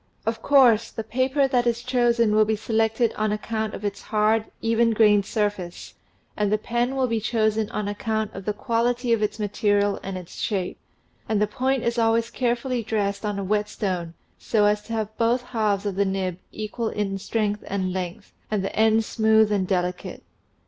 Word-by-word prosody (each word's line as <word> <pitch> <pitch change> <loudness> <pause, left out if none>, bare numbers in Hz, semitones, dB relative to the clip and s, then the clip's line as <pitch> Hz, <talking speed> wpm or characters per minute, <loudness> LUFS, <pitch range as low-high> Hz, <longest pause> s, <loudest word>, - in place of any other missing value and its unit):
Of 225 0 -2
course, 250 -6 +5
the 225 - -5
paper 260 +5 +1
that 245 -2 +1
is 235 0 0
chosen 240 -3 +2
will 215 0 +5
be 220 +1 0
selected 225 +1 +1
on 215 0 0
account 220 0 -3
of 210 - -7
its 200 -1 -3
hard, 215 +1 +1
even 230 0 +2
grained 210 -2 +4
surface, 205 -6 -3 0.4
and 210 -1 0
the 215 - +3
pen 240 +4 -1
will 265 -1 +2
be 230 -2 0
chosen 220 -1 0
on 210 -1 -3
account 220 +1 -2
of 195 0 -8
the 210 - +1
quality 235 +3 0
of 225 - +1
its 210 0 -1
material 205 -1 +1
and 195 -1 -5
its 180 -1 -10
shape, 190 -4 -2 0.5
and 215 -2 +2
the 210 - +3
point 260 +4 -1
is 235 0 0
always 230 +1 +2
carefully 245 0 -1
dressed 205 -2 -2
on 210 -1 -2
a 200 - -2
whetstone 190 -4 -2 0.2
so 210 -2 +2
as 210 0 +2
to 230 - -6
have 220 -1 -3
both 235 +2 +2
halves 215 -5 -1
of 200 - -1
the 200 +2 +1
nib 190 -2 -2
equal 220 +1 -3
in 195 -2 -2
strength 210 0 -1
and 190 -2 -2
length, 180 -2 -5 0.2
and 210 -3 -1
the 195 - -4
ends 220 0 +3
smooth 220 -1 +3
and 195 -3 +1
delicate. 180 -1 -2
215 Hz, 190 wpm, -24 LUFS, 205-230 Hz, 0.5 s, course